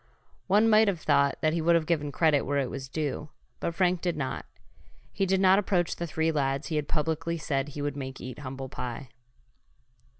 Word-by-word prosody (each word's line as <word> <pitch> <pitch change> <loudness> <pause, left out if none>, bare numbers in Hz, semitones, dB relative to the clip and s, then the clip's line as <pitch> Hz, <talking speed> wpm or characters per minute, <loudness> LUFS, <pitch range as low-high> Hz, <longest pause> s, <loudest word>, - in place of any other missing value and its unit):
One 205 +4 +4
might 220 0 +6
have 190 -4 0
thought 140 0 +3
that 155 0 +2
he 170 - 0
would 170 +1 +4
have 165 -2 +2
given 150 -3 0
credit 155 -2 +3
where 145 +1 -1
it 135 -3 0
was 135 -1 -6
due, 150 +1 -3 0.3
but 170 - -3
Frank 180 -1 +2
did 175 -3 -1
not. 135 -3 -3 0.7
He 195 -1 0
did 190 +1 +2
not 190 +1 +6
approach 180 -4 0
the 170 - -4
three 160 0 0
lads 140 0 -1
he 160 - -2
had 150 -1 -2
publicly 160 +2 -1
said 145 -3 -2
he 145 0 -5
would 145 -1 -2
make 135 -1 -6
eat 125 +1 -7
humble 135 -1 -6
pie. 125 +1 -6
155 Hz, 205 wpm, -28 LUFS, 140-170 Hz, 0.7 s, might